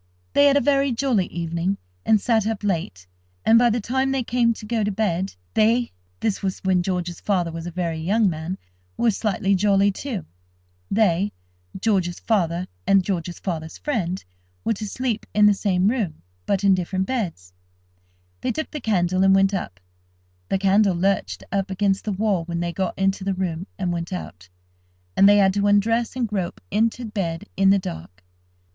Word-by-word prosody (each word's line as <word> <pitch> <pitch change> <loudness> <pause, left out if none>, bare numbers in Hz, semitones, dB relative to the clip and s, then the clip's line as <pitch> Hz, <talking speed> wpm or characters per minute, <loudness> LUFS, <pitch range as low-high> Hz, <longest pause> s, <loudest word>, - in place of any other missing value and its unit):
They 285 - +5
had 280 0 +5
a - - +3
very 275 -1 +2
jolly 235 -6 +1
evening, 170 +3 -2 0.3
and 215 - +5
sat 220 -1 +1
up 220 -2 -3
late, 160 - -2 0.4
and, 230 +1 +6
by 240 0 +5
the 235 +1 +1
time 265 +5 0
they 270 -1 0
came 235 0 +2
to 225 -1 -6
go 220 0 0
to 205 - 0
bed, 190 - -1 0.2
they 230 +3 +3 0.3
(this 215 -3 0
was 190 -2 -2
when 185 -1 +2
George's 175 -2 -3
father 180 -5 0
was 165 +1 -6
a - - -5
very 170 -2 -2
young 205 +7 +2
man) 170 +2 -3 0.4
were 235 - +3
slightly 205 -1 0
jolly, 200 +1 +3
too. 210 - -5 0.6
They 200 -1 +2 0.5
(George's 185 -4 0
father 180 -5 0 0.2
and 195 -1 +5
George's 175 -2 -3
father's 160 -4 -5
friend) 190 - -2 0.4
were - - +2
to 215 0 -5
sleep 245 0 -3
in 210 0 +6
the 210 - +6
same 195 -2 +1
room, 210 - -1 0.2
but 200 0 +1
in 195 -1 +5
different 185 +1 -1
beds. 170 - -4 0.9
They - - 0
took 315 +6 -4
the 300 - -5
candle, 185 -4 +1
and 195 0 +6
went 195 +1 +3
up. 100 - -4 0.7
The - - +2
candle 195 0 +3
lurched 195 +3 0
up 195 0 -1
against 195 0 0
the 215 - -1
wall 200 -3 0
when 170 0 -3
they 170 0 -2
got 190 -1 -2
into 195 0 0
the 195 0 -1
room, 180 -1 -3
and 180 -3 -1
went 170 +1 -4
out, 90 - -7 0.7
and 195 - +7
they 205 - +6
had 195 -1 +4
to 205 0 +1
undress 225 +4 +2
and 250 -3 0
grope 195 -4 -3
into 225 +3 +1
bed 195 -4 -3
in 195 0 +4
the 200 - +6
dark. 90 - -7
195 Hz, 185 wpm, -23 LUFS, 175-220 Hz, 0.9 s, and